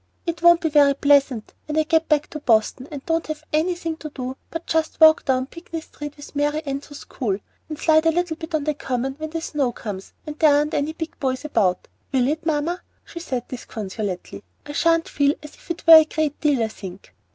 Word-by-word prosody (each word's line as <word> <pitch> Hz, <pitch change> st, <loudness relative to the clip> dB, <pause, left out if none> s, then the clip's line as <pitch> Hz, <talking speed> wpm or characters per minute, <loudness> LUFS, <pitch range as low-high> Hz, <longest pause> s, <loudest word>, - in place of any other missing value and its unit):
"It 335 Hz, -1 st, -3 dB
won't 345 Hz, 0 st, +6 dB
be 320 Hz, -, +1 dB
very 285 Hz, -2 st, +5 dB
pleasant 280 Hz, -5 st, +2 dB
when 305 Hz, 0 st, -2 dB
I 315 Hz, -, +4 dB
get 320 Hz, +1 st, +1 dB
back 300 Hz, -1 st, +3 dB
to 305 Hz, -, -5 dB
Boston, 240 Hz, 0 st, +1 dB
and 285 Hz, -3 st, -8 dB
don't 330 Hz, 0 st, 0 dB
have 310 Hz, 0 st, -5 dB
anything 330 Hz, 0 st, 0 dB
to 310 Hz, -, -7 dB
do 260 Hz, -2 st, -5 dB
but 330 Hz, 0 st, -6 dB
just 320 Hz, -1 st, -1 dB
walk 315 Hz, 0 st, +7 dB
down 260 Hz, -1 st, +1 dB
Pinckney 335 Hz, +2 st, -8 dB
Street 295 Hz, -2 st, -9 dB
with 290 Hz, 0 st, -12 dB
Mary 295 Hz, +2 st, 0 dB
Anne 275 Hz, -1 st, -2 dB
to 290 Hz, +1 st, -13 dB
school, 225 Hz, -8 st, -3 dB, 0.3 s
and 305 Hz, -, -5 dB
slide 315 Hz, 0 st, +3 dB
a -, -, +5 dB
little 345 Hz, 0 st, -1 dB
bit 320 Hz, 0 st, -5 dB
on 305 Hz, -, 0 dB
the 305 Hz, +1 st, 0 dB
Common 265 Hz, -2 st, -3 dB
when 315 Hz, 0 st, -4 dB
the 330 Hz, +1 st, -4 dB
snow 285 Hz, -6 st, -1 dB
comes 200 Hz, -4 st, -7 dB
and 300 Hz, 0 st, -7 dB
there 305 Hz, -3 st, +6 dB
aren't 295 Hz, +1 st, +1 dB
any 290 Hz, +2 st, -1 dB
big 320 Hz, 0 st, -7 dB
boys 260 Hz, +1 st, -2 dB
about, 200 Hz, -11 st, +1 dB, 0.2 s
will 255 Hz, -2 st, +2 dB
it, 315 Hz, +3 st, -2 dB
mamma?" 320 Hz, +3 st, 0 dB, 0.2 s
she 340 Hz, -, -8 dB
said, 255 Hz, -8 st, -4 dB
disconsolately. 200 Hz, -, -6 dB, 0.2 s
"I -, -, -7 dB
sha'n't 330 Hz, +2 st, +2 dB
feel 285 Hz, 0 st, +2 dB
as 300 Hz, -, -10 dB
if -, -, -20 dB
that 340 Hz, -1 st, -5 dB
were 325 Hz, 0 st, +11 dB
a -, -, -1 dB
great 305 Hz, -2 st, -2 dB
deal, 285 Hz, -6 st, +2 dB
I 220 Hz, -, -1 dB
think." 190 Hz, -3 st, -10 dB
295 Hz, 225 wpm, -22 LUFS, 265-320 Hz, 0.3 s, were